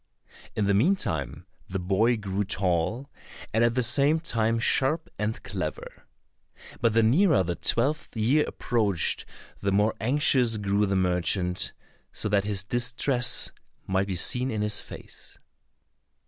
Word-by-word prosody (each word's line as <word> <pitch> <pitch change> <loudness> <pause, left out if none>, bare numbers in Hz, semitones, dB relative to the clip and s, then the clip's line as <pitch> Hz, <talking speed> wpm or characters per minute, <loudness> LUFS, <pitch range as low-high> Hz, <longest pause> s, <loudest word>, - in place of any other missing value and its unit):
In 105 - 0
the 100 - +2
meantime 100 - 0 0.2
the 95 - -3
boy 100 +6 +1
grew 100 -1 -3
tall, 95 +7 -1 0.4
and 110 +2 +2
at 120 0 +2
the 125 - +1
same 140 +6 +4
time 115 -8 0
sharp 135 +7 +1
and 105 +1 -3
clever. 95 -6 -6 0.7
But 115 -2 +1
the 115 0 +3
nearer 130 - +3
the 85 0 -2
twelfth 130 - -1
year 130 +8 +2
approached 105 -8 -1 0.4
the 100 - 0
more 105 +3 +2
anxious 125 -2 +2
grew 100 0 0
the 95 - -1
merchant, 90 0 0 0.4
so - - -3
that 100 -1 +1
his 100 -2 0
distress 120 +2 +2 0.3
might 95 +1 0
be 95 - -3
seen 125 +8 +2
in 110 -3 -2
his 105 -1 -2
face. - - -11
110 Hz, 140 wpm, -26 LUFS, 95-125 Hz, 0.7 s, same